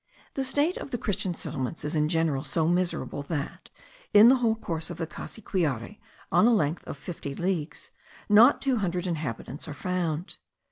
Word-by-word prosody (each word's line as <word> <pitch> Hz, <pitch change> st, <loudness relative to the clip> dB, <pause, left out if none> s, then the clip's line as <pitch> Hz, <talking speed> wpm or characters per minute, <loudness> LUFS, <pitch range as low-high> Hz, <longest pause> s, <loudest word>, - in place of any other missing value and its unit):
The 270 Hz, -, -1 dB
state 290 Hz, +6 st, +1 dB
of -, -, -6 dB
the 245 Hz, -, -2 dB
Christian 200 Hz, -4 st, -2 dB
settlements 140 Hz, +2 st, -4 dB
is 150 Hz, -, -2 dB
in 150 Hz, 0 st, +2 dB
general 160 Hz, -5 st, +1 dB
so 160 Hz, +1 st, 0 dB
miserable 175 Hz, -4 st, 0 dB
that, 145 Hz, 0 st, -5 dB, 0.5 s
in 215 Hz, +3 st, +10 dB
the 265 Hz, -, +6 dB
whole 230 Hz, -3 st, +2 dB
course 165 Hz, -7 st, -4 dB
of 175 Hz, -, -6 dB
the 165 Hz, -, -2 dB
Cassiquiare, 170 Hz, -, -3 dB, 0.3 s
on 220 Hz, -, +5 dB
a 240 Hz, -, +5 dB
length 155 Hz, -3 st, -1 dB
of -, -, -6 dB
fifty 140 Hz, -2 st, -6 dB
leagues, 175 Hz, -3 st, -3 dB, 0.4 s
not 220 Hz, +5 st, +6 dB
two 265 Hz, -2 st, +2 dB
hundred 180 Hz, -3 st, -1 dB
inhabitants 150 Hz, -5 st, -4 dB
are 150 Hz, -, -6 dB
found. 175 Hz, -1 st, -2 dB
175 Hz, 175 wpm, -27 LUFS, 150-210 Hz, 0.5 s, in